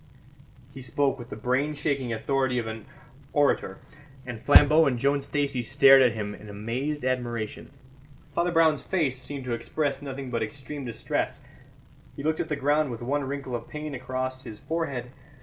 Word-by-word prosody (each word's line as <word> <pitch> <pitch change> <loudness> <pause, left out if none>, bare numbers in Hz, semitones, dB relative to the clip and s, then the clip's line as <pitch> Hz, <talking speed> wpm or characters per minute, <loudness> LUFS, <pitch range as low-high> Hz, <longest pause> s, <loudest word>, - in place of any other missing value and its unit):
He 135 - -9
spoke 135 +1 0
with 120 0 -9
the - - -6
brain 130 +7 0
shaking 140 -4 -1
authority 130 +3 0
of 120 - -1
an 110 +1 -6 0.5
orator, 140 -9 +2 0.5
and 120 -3 -6
Flambeau 150 +2 +7
and 125 -3 +1
Joan 140 +3 +2
Stacey 140 -2 -1
stared 135 +2 +7
at 125 -3 +5
him 105 -2 -4
in 105 0 -11
amazed 125 +8 -3
admiration. 120 -4 -2 0.6
Father 175 +1 +1
Brown's 160 -3 +4
face 140 -9 0
seemed 140 0 -5
to 125 - -2
express 140 +4 -2
nothing 135 -2 -6
but 115 -1 -1
extreme 135 +5 -5
distress; 115 -3 -2 0.8
he 140 - -7
looked 155 +1 0
at 160 - -2
the 150 - 0
ground 145 +1 +2
with 120 -1 -6
one 140 +3 0
wrinkle 135 -2 -4
of 115 -1 -6
pain 150 -1 -5
across 130 0 -3
his 105 - -8
forehead. 135 -5 -3
135 Hz, 170 wpm, -27 LUFS, 120-145 Hz, 0.8 s, Flambeau